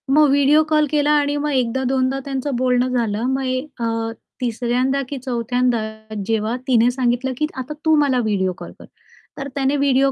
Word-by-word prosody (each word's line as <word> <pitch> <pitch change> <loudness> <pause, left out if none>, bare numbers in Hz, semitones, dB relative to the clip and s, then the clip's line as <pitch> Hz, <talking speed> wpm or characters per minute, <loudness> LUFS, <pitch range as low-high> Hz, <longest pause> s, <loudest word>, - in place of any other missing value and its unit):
मग 300 -2 +6
video 285 +2 +4
call 305 -1 +3
केला 295 0 +2
आणि 290 0 0
मग 295 0 -1
एकदा-दोनदा 260 +1 0
त्यांचं 270 -1 -2
बोलणं 250 0 +2
झालं 230 -3 -1
मग 265 0 -1
ए 255 0 0 0.2
अ, 230 - -1 0.6
तिसऱ्यांदा 250 +3 0
की 280 - -4
चौथ्यांदा 245 -1 0 0.5
जेव्हा 225 +1 0
तिने 240 -1 +4
सांगितलं 250 0 0
की 305 - +1
आता 270 +4 -5
तू 315 0 +5
मला 265 -4 +2
व्हिडिओ 190 -3 0
कॉल - - -9
कर, - - -12 0.5
तर 275 0 -4
त्याने 275 +1 +1
व्हिडिओ 275 -1 +3
260 Hz, 170 wpm, -20 LUFS, 245-280 Hz, 0.6 s, मग